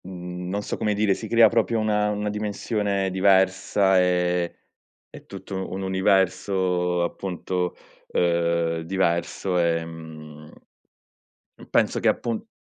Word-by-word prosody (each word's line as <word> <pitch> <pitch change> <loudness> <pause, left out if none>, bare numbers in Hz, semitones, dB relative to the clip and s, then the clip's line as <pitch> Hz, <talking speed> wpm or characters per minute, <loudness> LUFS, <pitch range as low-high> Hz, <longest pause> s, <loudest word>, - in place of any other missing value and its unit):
Mhmm, 90 -1 -7
non 100 +2 -2
so - - -4
come 105 -1 0
dire, 105 -1 +2
si 110 - -6
crea 115 +1 +6
proprio 115 - +1
una 105 -1 +1
una 105 0 -2
dimensione 105 -2 -2
diversa 95 0 +3
e 90 -1 +1 0.5
e - - -13
tutto 95 0 -6
un 95 +1 -4
universo 95 -2 +1
appunto, 90 0 -3 0.3
uhm 85 -1 +1 0.3
diverso, 90 +1 -1
ehm, 80 -2 -4 1.1
mhmm, - - -15
penso - - +2
che - - +1
appun 115 -2 -2
95 Hz, 120 wpm, -24 LUFS, 90-100 Hz, 1.1 s, crea